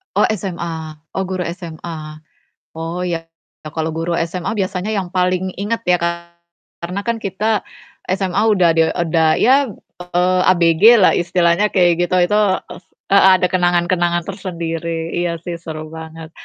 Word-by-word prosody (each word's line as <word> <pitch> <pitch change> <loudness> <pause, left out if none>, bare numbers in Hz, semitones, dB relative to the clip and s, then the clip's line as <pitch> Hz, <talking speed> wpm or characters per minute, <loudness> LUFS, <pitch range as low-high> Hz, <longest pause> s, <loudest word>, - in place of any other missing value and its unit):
Oh - - +3
SMA, 170 -6 -4 0.2
oh 190 - 0
guru 185 -1 -3 0.2
SMA. 160 -2 -8 0.5
Oh 165 +2 -5
ya 165 -2 -3 0.4
kalau 160 +1 -3
guru 165 +2 -2
SMA 180 +6 -4
biasanya 190 -1 -2
yang 185 -3 -3
paling 185 0 0
inget 225 +3 -2
ya 180 -3 +2
kan 170 0 -3 0.5
karena 180 +4 -4
kan 235 +1 -2
kita 210 +1 -1 0.5
SMA 190 0 -1 0.2
udah 175 -3 +4
de 160 0 +3
udah 165 -2 +2
ya 270 +3 +4 0.3
eee, 180 +1 +1
ABG 170 -1 +2 0.2
lah - - +6
istilahnya 175 +2 +2
kayak 175 -2 +2
gitu 185 - 0 0.2
itu 210 - +4 0.3
ef - - -10 0.3
heeh, 195 -1 +7
ada 180 - +1
kenangan-kenangan 175 -1 +1
tersendiri. 165 -3 -4
Iya 175 -1 -1
sih 170 -1 -5
seru 155 -1 -7
banget. 160 0 -9
175 Hz, 145 wpm, -18 LUFS, 165-185 Hz, 0.5 s, heeh